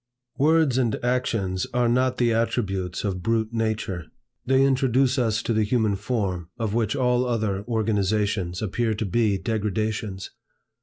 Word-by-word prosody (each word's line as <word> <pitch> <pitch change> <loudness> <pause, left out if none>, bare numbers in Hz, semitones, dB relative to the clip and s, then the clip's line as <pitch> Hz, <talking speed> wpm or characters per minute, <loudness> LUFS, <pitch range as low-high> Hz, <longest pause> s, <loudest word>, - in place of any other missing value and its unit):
Words 150 -3 +3
and 120 -4 +1
actions 115 -7 0
are 125 -1 +3
not 125 +2 +2
the 120 -2 +2
attributes 95 -6 -1
of 95 -3 -2
brute 110 +3 0
nature. 110 -6 -2 0.4
They 135 +1 +4
introduce 130 -1 +2
us 115 -2 0
to 115 - 0
the 110 - +2
human 110 -1 +1
form, 95 -5 -2
of 110 -3 -2
which 115 +1 0
all 125 -2 +2
other 110 -5 -1
organizations 105 -4 0
appear 110 +2 0
to 110 - -2
be 105 0 +1
degradations. 105 -1 -2
110 Hz, 145 wpm, -24 LUFS, 100-120 Hz, 0.4 s, They